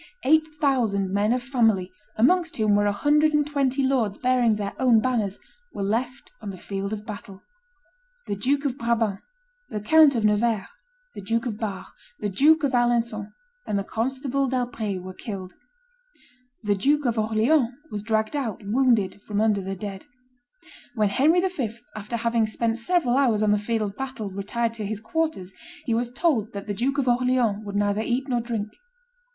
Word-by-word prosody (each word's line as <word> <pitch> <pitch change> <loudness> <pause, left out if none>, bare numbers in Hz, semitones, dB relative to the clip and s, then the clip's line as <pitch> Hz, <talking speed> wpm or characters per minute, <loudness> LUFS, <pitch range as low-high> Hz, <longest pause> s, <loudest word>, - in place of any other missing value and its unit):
Eight 315 +3 +4
thousand 230 -10 +1
men 205 +2 +2
of 250 0 0
family, 225 -8 +1 0.2
amongst 330 +9 +2
whom 215 -2 +2
were 205 0 +3
a - - +3
hundred 300 +8 +3
and 295 -1 +3
twenty 275 -2 0
lords 245 -7 +1
bearing 250 -3 +2
their 200 -1 -4
own 245 -4 +5
banners, 220 -5 0 0.4
were 200 - -2
left 240 +6 -2
on 210 - -6
the 190 - -7
field 195 +2 -4
of 215 -1 -5
battle. 200 -2 -9 0.8
The 205 - -2
Duke 275 +8 0
of 270 0 -2
Brabant, 225 -4 0 0.5
the 210 - -3
Count 300 +6 +5
of 225 -2 +1
Nevers, 210 -1 +2 0.5
the - - -8
Duke 230 +5 -1
of 220 -3 -4
Bar, 200 -4 -4 0.3
the 210 - -2
Duke 300 - +4
of 280 -2 +1
Alencon, 235 -3 +1 0.4
and 205 - 0
the 200 - -1
Constable 265 +5 -1
d'Albret 230 -7 -2
were 185 0 -7
killed. 190 -4 -7 1.1
The 205 -1 +2
Duke 285 +9 +1
of 235 -2 +1
Orleans 225 +5 +2 0.2
was 210 -1 -4
dragged 220 +3 0
out 230 -8 -3
wounded 220 -4 +2
from 205 0 -3
under 215 -2 +2
the 195 +1 -4
dead. 195 0 -7 0.9
When 210 -3 +2
Henry 310 - +3
V., 275 - -2 0.2
after 215 +2 -4
having 230 -1 +1
spent 230 +1 -1
several 260 -2 +1
hours 235 -6 +3
on 210 - +3
the 210 - +3
field 220 +1 -1
of 205 -1 -5
battle, 260 -7 -5
retired 225 +4 -2
to 225 -2 -6
his 215 0 -4
quarters, 265 - -2 0.3
he 235 - 0
was 235 +1 -1
told 245 - 0
that 200 -1 -6
the 205 - -3
Duke 260 +7 -1
of 270 -2 0
Orleans 245 -4 +2
would 200 -1 -6
neither 205 +1 +1
eat 250 +4 -1
nor 245 -3 0
drink. 225 -3 -3
230 Hz, 180 wpm, -25 LUFS, 205-260 Hz, 1.1 s, own